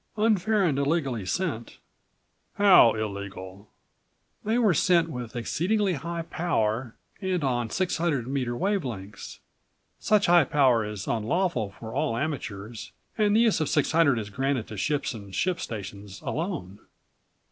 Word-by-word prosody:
"Unfair 215 -1 +2
and 145 -6 +1
illegally 140 - -1
sent." 145 - -3 0.8
"How 185 - +7
illegal?" 100 -2 -6 0.7
"They 220 +3 +1
were 220 -6 +4
sent 170 0 +3
with 125 -3 -6
exceedingly 185 - 0
high 170 +2 -4
power 120 -9 -1 0.3
and 185 -4 -1
on 120 -4 0
600 170 - 0
meter 130 -3 -2
wave 195 +1 0
lengths. 100 -5 -8 0.6
Such 210 -1 +3
high 175 -3 +5
power 130 -5 +3
is 105 -2 -5
unlawful 120 - 0
for 110 -1 -7
all 115 - 0
amateurs 115 -6 -5 0.2
and 210 -1 +2
the 225 - +5
use 220 -8 +3
of 155 - 0
600 150 -2 +3
is 105 -2 -5
granted 135 0 -1
to 110 - -7
ships 145 +6 -1
and 100 -4 -9
ship 185 -2 0
stations 100 -2 -7
alone. 150 - -4
135 Hz, 135 wpm, -26 LUFS, 110-175 Hz, 0.8 s, How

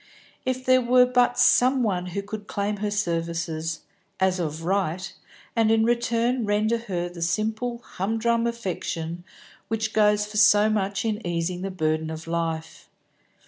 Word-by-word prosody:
If 255 0 -2
there 255 0 +5
were 250 +1 +5
but 245 -1 +2
some 255 +1 +4
one 180 -5 -1
who 200 +3 -4
could 205 0 -7
claim 205 +1 -2
her 210 +1 -2
services, 165 -4 -2 0.4
as 190 -1 +2
of 160 -1 -3
right, 185 -1 -1 0.4
and 225 -2 +3
in 225 0 +4
return 235 +1 +1
render 215 +2 +1
her 180 -6 -3
the 175 -1 -10
simple 220 +7 -1
hum 200 +5 -3
drum 235 +1 +1
affection 175 -7 -4 0.4
which 220 0 -2
goes 210 -1 +3
for 210 0 -7
so 205 +1 +5
much 200 0 -1
in 215 0 -2
easing 175 +1 -2
the 195 - -3
burden 155 -3 -1
of 160 0 -6
life. 165 -1 -4
205 Hz, 155 wpm, -25 LUFS, 175-230 Hz, 0.4 s, there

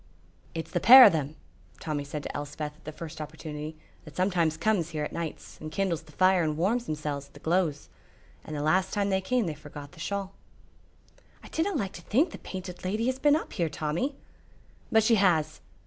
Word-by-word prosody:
"It's 165 - -5
the 175 - 0
pair 255 +8 +11
o' - - +10
them," 155 -2 -2 0.4
Tommy 150 -2 -3
said 145 +1 -6
to - - -6
Elspeth 145 +1 -5
at - - -25
the 155 - -5
first 155 0 -8
opportunity, 155 0 -7 0.3
"that 155 - -13
sometimes 175 -4 +1
comes 190 -4 +1
here 155 -2 -3
at - - -5
nights 165 -2 -6
and 155 0 -6
kindles 175 -2 -1
the 155 -1 -18
fire 185 +3 +4
and 155 -2 -1
warms 225 +8 +1
themsels 150 -2 -3
at - - -27
the - - -11
gloze. 160 -2 0 0.6
And 155 - -7
the 145 - -2
last 185 +5 +2
time 200 -1 0
they 190 0 +2
came 245 +3 +1
they 165 - -2
forgot 150 -1 -10
the - - -16
shawl." 195 +2 -3 1.1
"I - - -11
dinna 345 +5 0
like 200 -8 -2
to 175 - -9
think 280 - +2
the - - -9
Painted 185 -1 -7
Lady 210 +5 -1
has 260 +1 0
been 295 +1 +5
up 315 - -3
here, 170 -5 0
Tommy." 160 - -2 0.8
"But 220 -1 +5
she 225 +1 +4
has. 155 -5 +2
165 Hz, 210 wpm, -28 LUFS, 155-200 Hz, 1.1 s, pair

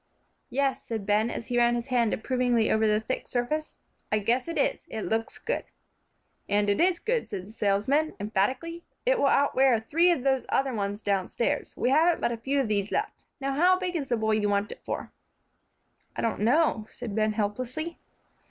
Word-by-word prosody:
"Yes," 275 0 0
said 220 -4 -5
Ben, 210 +3 +2
and - - -4
he 245 +1 0
ran 240 0 +4
his 240 +2 -4
hand 240 -3 +2
approvingly 245 -1 +1
over 220 0 +3
the 210 0 +3
thick 220 +4 -4
surface, 300 +6 -2 0.3
"I 215 - +3
guess 235 +6 0
it 335 - -4
is; - - 0
it 220 - -4
looks 225 +1 -2
good." - - -2 0.9
"And 205 0 +2
it 200 - +1
is 360 0 +4
good," 470 +6 -1
said 185 -2 -5
the 205 - -12
salesman, 225 +9 +1
emphatically; 255 - -1 0.2
"it'll - - +3
outwear 270 -3 +4
three 330 +10 +3
of 280 -8 0
those 265 -1 +1
other 270 -1 +1
ones 205 -1 -3
downstairs. 205 +8 -1
We 250 - +1
haven't 320 +4 +4
but - - 0
a 235 - -3
few 270 +5 -1
of 265 - +1
these 205 -1 -1
left. - - -3
Now, 275 0 -1
how 360 +6 +4
big 365 -1 -3
is 285 -5 -2
the 240 - +1
boy 220 0 0
you 215 -1 +2
want 200 +1 0
it - - -10
for?" - - -5 1.0
"I - - -3
don't 230 - 0
know," 235 -2 +2
said 235 -4 -7
Ben, 215 -1 +1
helplessly. 255 +10 -3
240 Hz, 195 wpm, -27 LUFS, 215-285 Hz, 1.0 s, ran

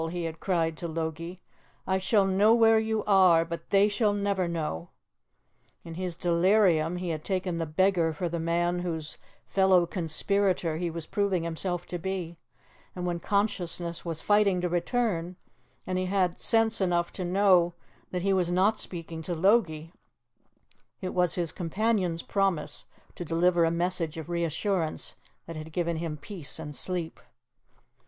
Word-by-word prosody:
he 175 0 -4
had 165 -1 -5
cried 165 -4 0
to 170 +2 -5
Logie. 165 +2 -5 0.4
"I 190 0 +1
shall 195 +1 +3
know 200 +4 +4
where 225 -1 +5
you 220 -1 -1
are, 185 -5 +5
but 170 0 -7
they 200 +1 +5
shall 210 0 +1
never 200 -3 0
know!" 155 - -3 0.9
In 165 - -8
his 180 0 -3
delirium, 175 -1 +3
he 180 0 -4
had 155 -2 -3
taken 185 -3 -2
the 165 - -2
beggar 170 +1 +2
for 175 +3 -3
the 170 0 -3
man 175 +2 0
whose 160 -4 -4 0.3
fellow 190 -2 +4
conspirator 175 0 0
he 175 +1 -2
was 165 -1 -5
proving 195 -2 0
himself 175 +1 -3
to 175 - -5
be, 175 -2 -4 0.6
and 180 -1 -4
when 175 -1 -1
consciousness 175 -4 -1
was 165 -2 -2
fighting 205 -3 +3
to 180 - -1
return, 175 -1 -1 0.5
and 185 0 -1
he 185 - -1
had 185 -2 0
sense 225 -2 +2
enough 175 -2 +1
to 185 - -4
know 180 -2 +3 0.3
that 180 -1 -3
he 195 0 +2
was 180 -2 +1
not 195 +5 +2
speaking 165 -2 -6
to 175 +2 -3
Logie, 165 -4 +2 1.1
it 185 - -4
was 180 -2 +2
his 170 -3 -1
companion's 185 -1 -1
promise 185 -7 -1 0.3
to - - -6
deliver 170 +1 +2
a - - +2
message 170 -1 -1
of 160 +1 -7
reassurance 170 0 -1 0.3
that 165 - -8
had 155 +1 -7
given 170 0 -1
him 160 -2 -4
peace 165 0 -5
and 150 -2 -7
sleep. 175 -1 -1
175 Hz, 160 wpm, -28 LUFS, 165-190 Hz, 1.1 s, where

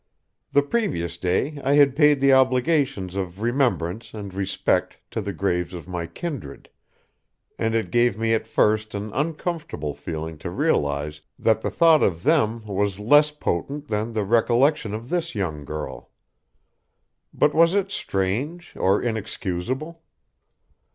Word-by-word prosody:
The 145 0 +4
previous 140 - -1
day 95 - -1
I 135 - +2
had 140 -2 +5
paid 150 -2 +4
the 135 0 +5
obligations 130 - +2
of 95 +1 -4
remembrance 120 -6 0
and 100 -3 -7
respect 95 0 0
to 110 - -2
the 100 0 -4
graves 90 -1 -1
of 85 0 -9
my 90 -2 -4
kindred, 140 - -7 0.9
and 115 0 0
it 115 - -1
gave 120 -3 +3
me 115 0 +1
at 110 - -1
first 110 0 +1
an 105 +1 -5
uncomfortable 155 - -3
feeling 80 0 -6
to - - -5
realize 75 +1 0 0.2
that 110 -1 +2
the - - -1
thought 165 -2 +5
of 85 -2 +1
them 115 -8 +2
was 100 -1 -1
less 145 +8 +5
potent 145 +1 -3
than 110 +2 -1
the 105 -2 -1
recollection 120 +2 +2
of 115 +3 -8
this 170 -5 -2
young 80 -8 -3
girl. 70 -5 -6 1.2
But 150 - +2
was 165 +3 +4
it 200 -1 0
strange 130 - -2
or 95 +2 +2
inexcusable? 115 - -3
110 Hz, 145 wpm, -24 LUFS, 95-145 Hz, 1.2 s, had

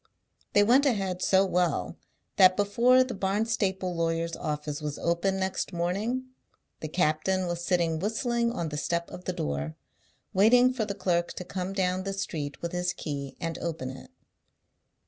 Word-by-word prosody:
They 205 - +6
went 260 +7 +5
ahead 195 -7 0
so 190 0 +4
well 180 -2 0 0.4
that 185 -1 +7
before 235 +6 +4
the 255 -1 -5
Barnstaple 195 -2 0
lawyer's 165 0 -1
office 150 0 -4
was 150 -1 -4
open 170 +3 0
next 190 0 -2
morning, 200 +9 -1 0.5
the 155 - -4
captain 180 +3 +1
was 175 -1 -3
sitting 170 -3 +1
whistling 235 +4 0
on 170 -8 -3
the 150 - -5
step 170 +3 -2
of 180 - -9
the 185 - -1
door, 70 - -3 0.6
waiting 245 +6 +5
for 235 -4 -1
the 200 - -4
clerk 175 -2 0
to - - -6
come 185 +1 -4
down 185 -1 0
the 195 +1 -3
street 155 -7 -4
with 170 - -2
his 180 0 -1
key 140 -3 -5
and 165 -1 -3
open 160 -6 -4
it. 130 - -11
180 Hz, 165 wpm, -28 LUFS, 165-200 Hz, 0.6 s, that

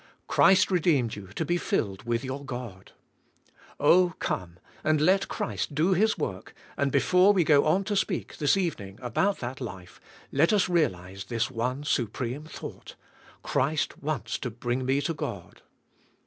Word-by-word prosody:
Christ 190 0 +4
redeemed 155 -10 +2
you 100 -2 -9
to 100 - -4
be 175 +3 +1
filled 100 - -2
with 120 +1 0
your 135 +2 -5
God. 120 -8 -8 0.9
Oh, 180 -1 +4
come 85 -1 -3 0.3
and 155 -1 +2
let 185 +6 +3
Christ 200 -7 -3
do 165 +6 +3
His 215 +5 +2
work, 95 -1 -5 0.2
and 140 -1 0
before 180 +9 +4
we 185 -3 +3
go 150 -2 +4
on 185 +6 +3
to 205 +1 -2
speak, 190 -2 -2
this 145 +4 +3
evening, 105 - -3
about 130 - 0
that 125 +2 -5
life, 95 -7 -8 0.3
let 155 +5 +3
us 205 -4 +3
realize 95 - -1
this 115 +2 -1
one 125 +5 -2
su 130 -5 +1
preme 130 +8 -5
thought, - - -9 0.5
Christ 145 +4 0
wants 140 -8 -3
to 125 - -3
bring 120 +2 -3
me 135 +2 +2
to 165 - -1
God. 100 - -6
140 Hz, 160 wpm, -27 LUFS, 115-175 Hz, 0.9 s, Christ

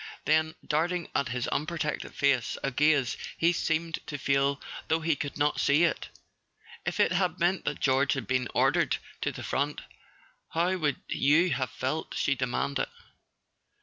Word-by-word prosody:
Then, 160 +1 +2
darting 170 +3 0
at 140 - +1
his 125 0 -2
unprotected 155 0 -2
face 135 -4 +1
a 135 - 0
gaze 145 -1 +2 0.2
he 170 +1 +3
seemed 165 0 -1
to 145 - -4
feel 140 +1 +1 0.3
though 160 0 +1
he 160 -1 +2
could 145 0 -5
not 145 0 +1
see 145 +4 +4
it: 170 - 0 0.8
"If - - -2
it - - +4
had 180 -2 +1
meant 175 +2 +1
that - - -2
George 135 +1 +3
had 135 - -3
been 130 -1 0
ordered - - +3 0.2
to - - 0
the - - -8
front, - - -1 0.7
how 175 +3 +2
would 150 -5 0
you 160 +6 +3
have 130 -2 0
felt?" 135 +5 -3
she 140 - +2
demanded. 135 +2 -1
150 Hz, 160 wpm, -28 LUFS, 135-165 Hz, 0.8 s, see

